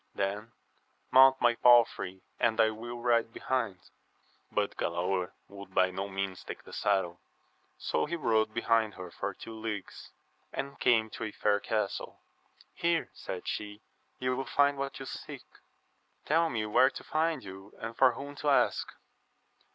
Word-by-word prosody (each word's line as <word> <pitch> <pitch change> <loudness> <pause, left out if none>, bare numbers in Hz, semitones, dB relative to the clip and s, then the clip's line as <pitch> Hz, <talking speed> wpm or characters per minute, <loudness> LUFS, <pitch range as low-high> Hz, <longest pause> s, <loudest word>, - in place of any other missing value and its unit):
Then 105 +3 -2 0.6
mount 135 +1 +7
my 120 0 +4
palfrey, 115 -6 +4 0.2
and 115 -1 +2
I 110 -1 +5
will 120 +2 -7
ride 120 -1 +2
behind. 115 -9 -3 0.6
But - - 0
Galaor 90 +2 -1
would 100 -1 -12
by 95 0 +4
no 95 +2 -4
means 95 -1 -3
take - - -8
the - - -13
saddle; 95 -4 0 0.6
so - - -1
he 170 - -2
rode 110 -8 +2
behind 115 -2 +1
her 90 -1 -8
for 95 +2 -4
two 115 - -9
leagues, 110 -3 -6 0.4
and 140 0 -5
came 110 -3 +3
to - - -6
a 110 - -4
fair 105 0 +1
castle: 105 -1 -2 0.5
Here, 170 -1 0
said 90 - -7
she, 105 0 -4 0.3
you 130 0 0
will 135 - -2
find 145 0 +2
what 140 0 -3
you 135 - -6
seek. - - -8 0.8
Tell 165 +2 +3
me 110 -5 -2
where 105 +5 +5
to - - -9
find 160 +1 0
you, 95 +1 -10
and 115 +1 -6
for 130 -1 +5
whom 140 +4 -7
to 150 - 0
ask. 140 - +3
110 Hz, 160 wpm, -30 LUFS, 100-130 Hz, 0.8 s, mount